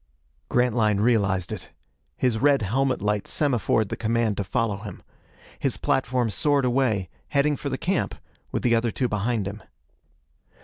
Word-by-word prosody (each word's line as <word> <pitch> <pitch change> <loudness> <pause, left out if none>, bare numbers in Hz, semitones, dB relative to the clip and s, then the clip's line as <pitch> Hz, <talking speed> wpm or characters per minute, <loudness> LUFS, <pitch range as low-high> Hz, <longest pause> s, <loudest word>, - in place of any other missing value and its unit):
Grantline 115 -4 +2
realized 100 -5 +2
it. - - -6 0.5
His 120 -4 +1
red 140 -2 +4
helmet 130 +3 0
light 105 -1 0
semaphored 115 -7 +1
the - - -2
command 115 -1 0
to 100 - 0
follow 110 0 -1
him. 100 0 -9 0.6
His - - -1
platform 125 -3 0
soared 140 - +2
away, 120 -7 +1 0.2
heading 145 +1 +2
for 140 - -4
the 130 - -2
camp, 185 +4 -1 0.4
with - - -2
the 120 - +3
other 115 +1 +2
two 125 +3 -1
behind 105 -1 -1
him. 100 +2 -6
115 Hz, 150 wpm, -25 LUFS, 105-130 Hz, 0.6 s, red